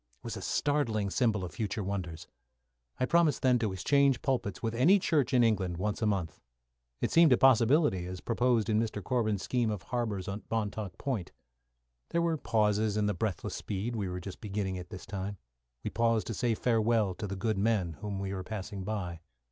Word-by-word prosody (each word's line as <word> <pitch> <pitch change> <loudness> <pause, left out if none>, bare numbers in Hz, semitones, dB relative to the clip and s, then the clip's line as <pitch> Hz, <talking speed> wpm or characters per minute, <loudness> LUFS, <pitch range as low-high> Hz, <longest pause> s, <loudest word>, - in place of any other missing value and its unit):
It - - -43
was - - -5
a - - -6
startling 115 -9 0
symbol 105 -6 +1
of 85 - -7
future 105 +3 -3
wonders. 90 -4 -4 0.7
I 130 - +2
promised 165 +1 +3
then 125 -2 +4
to 110 -3 0
exchange 135 +7 +2
pulpits 120 -8 -1
with 115 -1 -1
any 155 +12 +5
church 150 -8 +1
in 125 -2 +5
England 95 -6 +1
once 105 +4 -2
a 110 - +2
month. 95 -6 -1 0.6
It - - 0
seemed 165 -3 +6
a - - +4
possibility, 125 - +4
as 90 0 -6
proposed 120 0 +1
in 110 -1 +2
Mr. 110 -3 -2
Corbin's 110 -3 0
scheme 120 -3 0
of 105 -5 -3
harbours 110 -6 -2
at 100 +2 -4
Montauk 105 -4 -3
Point. 115 -11 -3 0.8
There 170 - +1
were 165 -1 +1
pauses 105 -3 +1
in 105 - +2
the 105 - +1
breathless 100 -1 -3
speed 105 +4 -3
we 100 -4 -2
were 90 0 -4
just 90 +1 -8
beginning 100 -3 -3
at 90 -1 -9
this 95 -3 -8
time. 95 +1 -5 0.5
We - - -3
paused 115 -1 +2
to 115 - -3
say 115 +1 0
farewell 115 -4 +2
to 105 +3 -5
the 100 - -4
good 100 +1 -1
men 100 -5 +1
whom 105 -2 -3
we 100 0 -3
were 95 -1 -4
passing 100 -1 -5
by. 95 -5 -4
105 Hz, 200 wpm, -30 LUFS, 95-120 Hz, 0.8 s, seemed